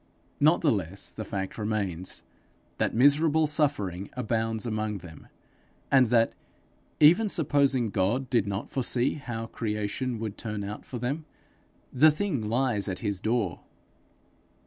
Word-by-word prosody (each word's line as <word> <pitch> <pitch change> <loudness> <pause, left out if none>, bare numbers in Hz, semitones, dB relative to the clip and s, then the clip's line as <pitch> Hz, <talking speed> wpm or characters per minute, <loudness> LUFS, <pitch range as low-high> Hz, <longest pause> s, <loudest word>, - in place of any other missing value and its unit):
Not 155 +4 +4
the 155 - +3
less 95 -2 -3
the 110 - -6
fact 95 0 -5
remains, 100 -5 -3 0.6
that - - 0
miserable 150 +5 +4
suffering 135 - 0
abounds 115 -2 -1
among 110 -2 -2
them, 85 -4 -12 0.6
and 130 -4 +5
that, 115 -1 +3 0.7
even 175 +9 +6
supposing 140 - +2
God 110 +8 0
did 115 -6 +1
not 100 +1 -4
foresee 125 -1 +1
how 120 -6 -5
creation 110 +3 -3
would 110 -2 -5
turn 105 -2 -4
out 105 +2 -6
for 125 - -6
them, 135 +6 -3 0.7
the 155 +5 +7
thing 155 - -1
lies 115 -4 0
at 90 - -3
his 100 -2 -1
door. 110 -6 0
115 Hz, 135 wpm, -27 LUFS, 105-135 Hz, 0.7 s, the